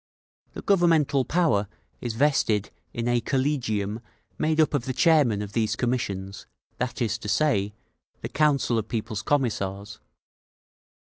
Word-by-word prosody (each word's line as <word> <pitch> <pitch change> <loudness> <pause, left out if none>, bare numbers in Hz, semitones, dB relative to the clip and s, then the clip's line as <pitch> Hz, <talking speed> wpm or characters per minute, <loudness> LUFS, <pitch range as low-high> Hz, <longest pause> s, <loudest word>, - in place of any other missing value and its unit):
The - - -8
governmental 165 -8 +3
power 150 - +1 0.3
is 120 -2 -4
vested 115 -6 +1 0.2
in 115 0 -3
a 120 0 +2
collegium 120 -7 -1 0.4
made 155 0 +1
up 155 - +3
of 135 -4 0
the 130 - -2
chairmen 135 - +3
of 100 0 -8
these 110 -2 0
commissions, 100 -6 -3 0.3
that 125 0 -2
is 115 0 -1
to 105 - -6
say, 105 -10 +1 0.5
the - - -5
Council 140 -6 +2
of 110 - -5
People's 110 -2 -3
Commissars. 105 -7 -2
120 Hz, 135 wpm, -25 LUFS, 105-145 Hz, 0.5 s, governmental